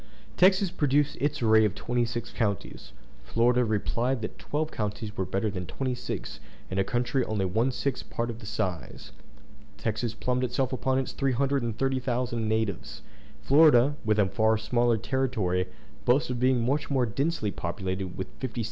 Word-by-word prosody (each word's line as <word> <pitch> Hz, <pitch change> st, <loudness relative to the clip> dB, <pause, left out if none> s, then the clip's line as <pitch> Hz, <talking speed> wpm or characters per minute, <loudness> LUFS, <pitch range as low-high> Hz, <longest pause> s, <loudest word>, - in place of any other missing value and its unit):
Texas 190 Hz, 0 st, +4 dB
produced 145 Hz, 0 st, +1 dB
its 145 Hz, -3 st, -1 dB
array 110 Hz, -1 st, +6 dB
of 105 Hz, -2 st, +1 dB
twenty 120 Hz, 0 st, 0 dB
six 115 Hz, 0 st, -5 dB
counties; 100 Hz, -5 st, -3 dB, 0.3 s
Florida 120 Hz, +2 st, +3 dB
replied 115 Hz, +3 st, 0 dB
that -, -, -6 dB
twelve 155 Hz, +1 st, -2 dB
counties 105 Hz, 0 st, -4 dB
were 95 Hz, -, -1 dB
better 100 Hz, +2 st, -1 dB
than 90 Hz, -3 st, -5 dB
twenty 130 Hz, +5 st, -2 dB
six 125 Hz, -, -5 dB, 0.3 s
in 95 Hz, -, -1 dB
a -, -, +4 dB
country 120 Hz, +5 st, 0 dB
only 105 Hz, -3 st, -1 dB
one 110 Hz, +8 st, +1 dB
sixth 130 Hz, 0 st, -3 dB
part 120 Hz, 0 st, -2 dB
of 115 Hz, -, -9 dB
the 110 Hz, -, -10 dB
size. 90 Hz, -5 st, -4 dB, 0.7 s
Texas 110 Hz, +1 st, -2 dB
plumed 125 Hz, +1 st, -1 dB
itself 125 Hz, +1 st, 0 dB
upon 130 Hz, +1 st, 0 dB
its 135 Hz, -, -1 dB
330,000 130 Hz, -3 st, 0 dB
natives; 110 Hz, -2 st, -2 dB, 0.4 s
Florida, 145 Hz, -2 st, +6 dB
with 110 Hz, -1 st, +2 dB
a 105 Hz, -, +4 dB
far 110 Hz, +4 st, +2 dB
smaller 120 Hz, +1 st, +2 dB
territory, 110 Hz, -7 st, 0 dB, 0.4 s
boasted 125 Hz, 0 st, +2 dB
of -, -, -6 dB
being 125 Hz, -2 st, +3 dB
much 140 Hz, +4 st, 0 dB
more 130 Hz, -3 st, +2 dB
densely 135 Hz, 0 st, -1 dB
populated 95 Hz, +1 st, -4 dB
with 95 Hz, -, -2 dB
56,000. 125 Hz, -3 st, -4 dB
120 Hz, 160 wpm, -28 LUFS, 110-130 Hz, 0.7 s, array